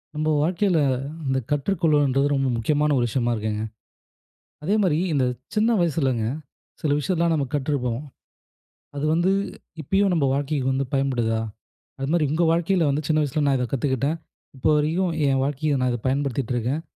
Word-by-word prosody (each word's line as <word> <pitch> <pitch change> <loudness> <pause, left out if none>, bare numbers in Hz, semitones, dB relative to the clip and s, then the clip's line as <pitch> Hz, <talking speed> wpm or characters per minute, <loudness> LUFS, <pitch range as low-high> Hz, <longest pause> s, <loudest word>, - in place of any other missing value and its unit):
நம்ப 155 +1 0
வாழ்க்கையில 180 +2 +1 0.5
இந்த 130 0 +1
கற்றுக்கொள்ளல்ன்றது 145 -3 +2
ரொம்ப 135 -1 +1
முக்கியமான 150 +6 +1
ஒரு 120 - +2
விஷயமா 120 0 0
இருக்குங்க. 105 0 -2 1.0
அதே 195 +7 +1
மாரி 165 -5 +2 0.2
இந்த 135 -3 +2 0.3
சின்ன 220 +2 +3
வயசுலங்க, 135 -8 +1 0.6
சில 155 - 0
விஷயத்தெல்லாம் 170 +2 +1
நம்ப 145 -3 0
கற்றுப்போம். 130 -4 -1 0.9
அது 145 +1 -2
வந்து 175 +3 +2 0.5
இப்பயும் 195 +6 +2
நம்ப 160 -5 +2
வாழ்க்கைக்கு 140 -1 -1
வந்து 135 +1 0
பயன்படுதா? 120 -5 +1 0.6
அது 135 - -2
மாரி 170 -3 +3
உங்க 160 +3 +1
வாழ்க்கையில 170 0 +2
வந்து, 145 +2 0
"சின்ன 155 -1 +2
வயசுல 150 +1 0
நான் 135 -1 +3
இதை 125 -1 -1
கத்துக்கிட்டேன். 140 +3 0 0.4
இப்போ 130 - +1
வரைக்கும் 165 +4 +1
என் 135 -1 +2
வாழ்க்கையில 145 0 0
நான் 125 0 +1
இத 120 - -2
பயன்படுத்திகிட்டுருக்கேன்." 130 0 -1
145 Hz, 150 wpm, -24 LUFS, 130-160 Hz, 1.0 s, சின்ன